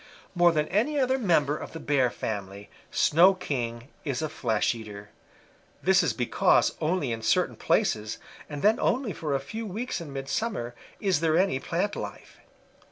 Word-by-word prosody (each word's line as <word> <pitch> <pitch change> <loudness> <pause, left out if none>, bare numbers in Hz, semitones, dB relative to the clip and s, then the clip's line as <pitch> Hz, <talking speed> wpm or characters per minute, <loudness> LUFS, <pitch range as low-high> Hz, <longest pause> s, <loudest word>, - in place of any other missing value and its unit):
"More 175 -1 +5
than 150 -2 0
any 245 +10 +1
other 260 0 +2
member 160 - +2
of - - -8
the 165 - -6
Bear 140 -5 +2
family, 100 -3 -6 0.2
Snow 180 +5 +5
King 120 -8 -4
is 140 0 -2
a 155 - -1
flesh 110 -4 0
eater. 105 -3 -9 0.7
This 190 +1 +5
is 165 -7 +1
because 120 +1 +2
only 155 -5 0
in 115 -1 -3
certain 110 - +1
places, 110 0 0 0.3
and 145 -2 -6
then 215 +2 +4
only 245 -5 0
for 150 -4 -2
a - - +1
few 220 +11 -6
weeks 215 +1 -4
in 155 -4 -8
midsummer, 135 - -3 0.3
is 190 -6 +1
there 160 0 +2
any 180 -8 +2
plant 185 +8 -2
life. - - -8
155 Hz, 165 wpm, -27 LUFS, 120-190 Hz, 0.7 s, More